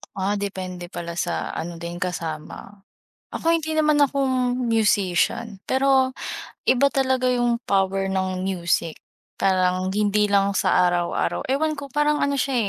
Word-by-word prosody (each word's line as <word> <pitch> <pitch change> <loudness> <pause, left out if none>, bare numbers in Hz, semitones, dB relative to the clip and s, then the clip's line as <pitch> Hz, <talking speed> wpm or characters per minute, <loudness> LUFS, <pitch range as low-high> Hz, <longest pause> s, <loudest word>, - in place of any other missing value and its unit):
Ah, 200 +2 -1
depende 185 -3 -5
pala 170 -1 -6
sa 175 - -2
ano 170 +1 -5
din 170 +1 -7
kasama. 175 +2 -5 0.6
Ako 330 - +1
hindi 315 -1 0
naman 305 -1 +3
ako 280 -1 +2 0.3
musician 220 -3 +1
pero 265 -1 +2 0.5
iba 275 +2 +4
talaga 260 -1 +1
yung 240 -1 0
power 195 -1 0
ng 185 -1 -1
music, 170 -3 -1 0.4
parang 185 -1 +2
hindi 210 +1 +2
lang 200 -1 +2
sa 180 -2 +2
araw-araw 175 +5 0
ewan 305 +4 0
ko, 280 - -7
parang 295 +1 +1
ano 280 0 +1
siya 270 0 0
200 Hz, 135 wpm, -23 LUFS, 185-260 Hz, 0.6 s, iba